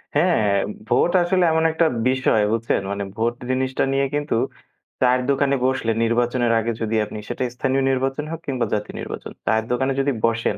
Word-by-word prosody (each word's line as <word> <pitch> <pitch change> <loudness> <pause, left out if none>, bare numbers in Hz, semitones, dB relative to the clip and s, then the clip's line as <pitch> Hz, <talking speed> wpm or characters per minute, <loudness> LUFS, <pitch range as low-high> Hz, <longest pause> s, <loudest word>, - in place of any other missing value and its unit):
হ্যাঁ, 145 - +3 0.3
ভোট 175 - +3
আসলে 180 +1 +2
এমন 160 0 +2
একটা 160 +1 +2 0.2
বিষয় 130 -5 +2
বুঝছেন? 115 -1 0
মানে 100 0 -2
ভোট 115 +2 0 0.2
জিনিসটা 130 0 0
নিয়ে 135 0 +2
কিন্তু 145 -3 -1 0.7
চায়ের 125 0 +4
দোকানে 140 0 +2
বসলে 130 -3 +1
নির্বাচনের 120 +1 +1
আগে 115 +1 -1
যদি 110 0 -1
আপনি, 105 - -8
সেটা - - -2
স্থানীয় 135 +1 0
নির্বাচন 135 +3 -1
হোক 165 - -4
কিংবা 130 -3 0
জাতীয় 105 0 -3
নির্বাচন, - - -7
চায়ের 110 0 +1
দোকানে 130 +2 +1
যদি 140 +1 +1
বসেন 115 0 0
130 Hz, 170 wpm, -22 LUFS, 115-140 Hz, 0.7 s, চায়ের